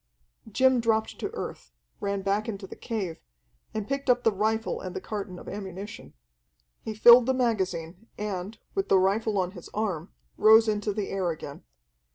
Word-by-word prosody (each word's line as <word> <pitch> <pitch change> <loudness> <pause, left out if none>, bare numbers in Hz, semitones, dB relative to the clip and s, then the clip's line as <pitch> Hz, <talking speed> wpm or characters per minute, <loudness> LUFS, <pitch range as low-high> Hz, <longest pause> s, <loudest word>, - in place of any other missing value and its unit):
Jim 260 +3 +4
dropped 220 -1 0
to - - -2
earth, - - -6 0.3
ran 200 -1 -2
back 205 +3 0
into 200 -3 -5
the - - -10
cave, 195 -8 -4 0.5
and 215 -2 -4
picked 275 0 -2
up 245 0 +4
the 225 - +4
rifle 220 +3 -1
and 185 -1 -6
the - - -2
carton 200 -2 -5
of - - -11
ammunition. 195 0 -7 0.7
He 220 - -5
filled 235 +2 +8
the 260 - +2
magazine, 190 -5 -1
and, 205 0 -4 0.2
with 390 -1 -1
the 195 - +6
rifle 205 +3 +1
on 185 -1 0
his 175 -4 -11
arm, 190 -6 -2 0.3
rose 220 +1 +7
into 210 0 0
the 200 0 -3
air 190 -2 -1
again. 150 -3 -7
210 Hz, 175 wpm, -27 LUFS, 190-225 Hz, 0.7 s, filled